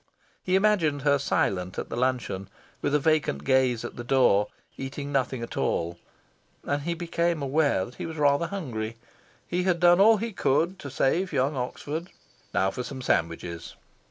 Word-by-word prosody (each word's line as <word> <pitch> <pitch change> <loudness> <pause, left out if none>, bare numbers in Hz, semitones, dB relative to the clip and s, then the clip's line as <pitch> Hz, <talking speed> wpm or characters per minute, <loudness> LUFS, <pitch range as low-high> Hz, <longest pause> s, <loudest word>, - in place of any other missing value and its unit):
He 185 - +1
imagined 185 -9 +2
her 140 -1 +3
silent 95 -8 0
at - - -4
the - - -4
luncheon, 120 -7 -1 0.3
with 145 0 +1
a - - +4
vacant 150 - +1
gaze 125 - +2
at - - -7
the 120 - -5
door, 120 -5 +3 0.3
eating 140 +2 -5
nothing 130 -3 0
at 115 - -7
all. 85 +1 -1 0.6
And 145 0 -1
he 170 +3 -2
became 170 -2 -1
aware 140 -8 +2
that 120 - -12
he - - -3
was 160 -1 -7
rather 145 +2 +3
hungry. 120 - -4 0.5
He 180 +1 0
had 180 -2 +1
done 175 +1 +6
all 220 +2 +7
he 225 +1 -4
could 170 +5 +1
to 140 - -7
save 175 +9 +1
young 140 0 +1
Oxford. 145 +6 -4 0.4
Now 95 0 +1
for 125 - -4
some 130 +1 -6
sandwiches! 85 -3 -2
140 Hz, 175 wpm, -27 LUFS, 120-170 Hz, 0.6 s, all